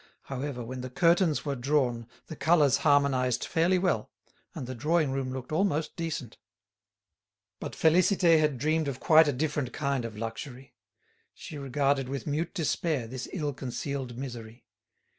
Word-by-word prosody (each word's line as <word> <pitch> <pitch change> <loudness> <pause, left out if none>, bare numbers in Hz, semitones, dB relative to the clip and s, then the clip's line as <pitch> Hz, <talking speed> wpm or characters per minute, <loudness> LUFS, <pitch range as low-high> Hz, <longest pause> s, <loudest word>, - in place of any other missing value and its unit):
However, 135 -2 -5
when 130 +2 -6
the 130 - -6
curtains 170 +3 +2
were 140 -1 -1
drawn 125 -3 0 0.2
the 160 - -8
colours 150 -4 +4
harmonised 140 -4 +2
fairly 170 +3 +2
well 175 - 0 0.5
and - - -5
the 130 - -5
drawing 150 +3 +1
room 135 -1 -2
looked 130 +1 -6
almost 160 -2 0
decent. 160 -8 -5 1.2
But - - -6
Félicité 170 0 +4
had 150 -3 +1
dreamed 155 +3 +1
of 135 -2 -4
quite 160 -1 +6
a - - +3
different 145 -2 -2
kind 140 -4 -1
of 115 -2 -6
luxury. 120 +4 -7 0.6
She 150 - -8
regarded 135 0 0
with 135 -2 -4
mute 155 +5 -2
despair 160 -5 0
this 130 +2 -6
ill 150 -6 -2
concealed 130 -1 -5
misery. 120 -3 -8
140 Hz, 150 wpm, -28 LUFS, 125-155 Hz, 1.2 s, quite